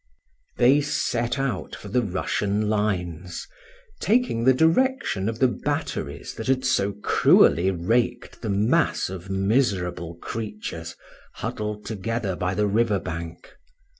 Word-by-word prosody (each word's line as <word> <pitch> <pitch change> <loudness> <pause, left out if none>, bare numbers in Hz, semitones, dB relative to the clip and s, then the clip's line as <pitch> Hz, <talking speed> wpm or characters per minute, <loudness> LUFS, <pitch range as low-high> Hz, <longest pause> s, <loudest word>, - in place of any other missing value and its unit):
They 135 +4 +5
set 120 -4 -1
out 135 -8 -2
for - - -10
the 125 +5 +1
Russian 100 +1 -1
lines, 90 -5 -2 0.5
taking 220 - +1
the 130 - +7
direction 165 - +2
of 115 - -4
the 130 - +4
batteries 120 - -3
that 110 - -6
had 130 0 +1
so 100 +1 +2
cruelly 90 +3 +5
raked 105 +7 -1
the 110 - -3
mass 110 - +2
of 95 0 -8
miserable 95 -5 0
creatures 105 -5 -6 0.4
huddled 105 0 -4
together 110 -2 -2
by 90 +1 -2
the 105 +2 +2
river 105 +1 +2
bank. 80 0 -7
105 Hz, 125 wpm, -24 LUFS, 95-120 Hz, 0.5 s, the